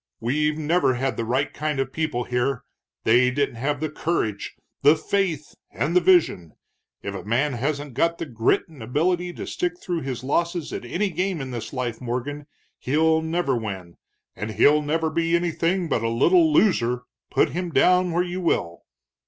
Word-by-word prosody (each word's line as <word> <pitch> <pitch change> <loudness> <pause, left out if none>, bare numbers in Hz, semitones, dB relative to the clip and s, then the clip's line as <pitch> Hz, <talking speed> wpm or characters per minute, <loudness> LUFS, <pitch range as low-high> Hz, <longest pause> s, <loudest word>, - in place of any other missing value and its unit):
We've 150 +6 0
never 155 -3 +2
had 130 -1 -1
the 115 - -2
right 130 +5 0
kind 150 -2 -2
of 135 0 -2
people 155 -6 -1
here, 125 +1 -1 0.4
they 125 +3 +4
didn't 135 -2 -1
have 145 +4 -1
the 155 - -1
courage, 135 -12 -2 0.3
the 145 +3 +6
faith, 165 -3 -1 0.2
and 145 - -2
the 180 - +6
vision. 160 - +3 0.5
If 100 - -4
a 100 - -6
man 130 +7 0
hasn't 140 +3 -3
got 170 +7 +1
the - - -4
grit 115 -5 +1
and 155 -6 -15
ability 175 +9 0
to - - -6
stick 175 0 -3
through 175 -3 -3
his 130 -2 -5
losses 170 +4 -1
at - - -5
any 190 +10 -1
game 180 +1 -1
in 135 -2 -5
this 115 -3 -5
life, 125 -3 -3
Morgan, 130 +4 -4 0.3
he'll 160 +4 +2
never 160 -4 0
win. 95 -7 -6 0.4
And 105 +3 -5
he'll 145 +8 +4
never 160 +2 -1
be 165 +1 +1
anything 175 +1 0
but 115 - 0
a 115 - 0
little 160 +8 +4
loser, 125 - +2 0.3
put - - +2
him 180 +1 -3
down 180 +4 +3
where 175 +2 +1
you 180 +1 -4
will." 85 - -1
145 Hz, 180 wpm, -24 LUFS, 125-170 Hz, 0.5 s, the